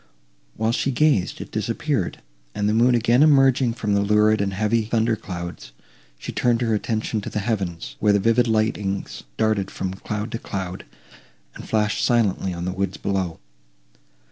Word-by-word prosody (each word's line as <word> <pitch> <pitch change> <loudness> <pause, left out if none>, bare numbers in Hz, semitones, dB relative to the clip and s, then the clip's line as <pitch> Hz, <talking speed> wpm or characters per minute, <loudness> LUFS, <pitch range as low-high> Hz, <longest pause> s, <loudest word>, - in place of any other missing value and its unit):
While 110 +1 0
she 130 - 0
gazed, 135 -8 +1
it - - -9
disappeared, - - -2 0.3
and, 105 - 0
the 105 - +2
moon 120 +2 +4
again 120 +2 +3
emerging 135 -5 +4
from 110 -3 -2
the 100 - +3
lurid 105 +1 +3
and 100 -1 0
heavy 110 +3 +1
thunder 115 0 +1
clouds, 85 - -7 0.4
she - - -6
turned 120 -1 +1
her 115 -2 +1
attention 110 0 -1
to - - -6
the - - -5
heavens, 95 - -3
where 105 - +3
the - - +4
vivid 115 +4 +3
lightnings 110 -3 -1 0.2
darted 110 -3 +1
from 95 -1 -4
cloud 105 +3 -5
to 115 - -3
cloud, 95 -4 -5 0.7
and - - -11
flashed 105 -1 +1
silently 105 -6 +1
on 85 0 -5
the 90 - -1
woods 95 0 -2
below. 95 -4 -2
105 Hz, 170 wpm, -23 LUFS, 95-115 Hz, 0.7 s, moon